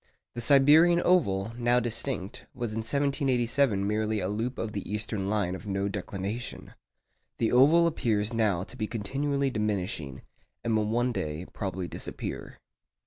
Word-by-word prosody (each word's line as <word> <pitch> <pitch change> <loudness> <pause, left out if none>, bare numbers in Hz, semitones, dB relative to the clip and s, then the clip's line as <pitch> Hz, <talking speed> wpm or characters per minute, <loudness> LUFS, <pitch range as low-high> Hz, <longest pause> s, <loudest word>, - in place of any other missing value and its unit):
The 120 - -5
Siberian 150 +7 +6
oval, 110 - +2
now 120 +1 +3
distinct, 115 -2 -2
was 120 -3 -3
in 110 - -3
1787 130 -4 +1
merely 110 +1 0
a 90 - -2
loop 115 +5 -3
of 110 - -3
the 100 -2 -5
eastern 105 -2 -1
line 100 -4 0
of 95 - -8
no 100 0 -1
declination. 100 +4 -5 0.6
The 115 - +1
oval 150 +7 +6
appears 110 -9 0
now 105 -6 +1
to - - -11
be 110 - -3
continually 140 +6 -1
diminishing, 100 - -3 0.4
and 115 -1 +1
will 105 -1 +1
one 120 +3 +1
day 80 -5 -4
probably 95 -2 -4
disappear. - - -6
110 Hz, 145 wpm, -28 LUFS, 100-125 Hz, 0.6 s, Siberian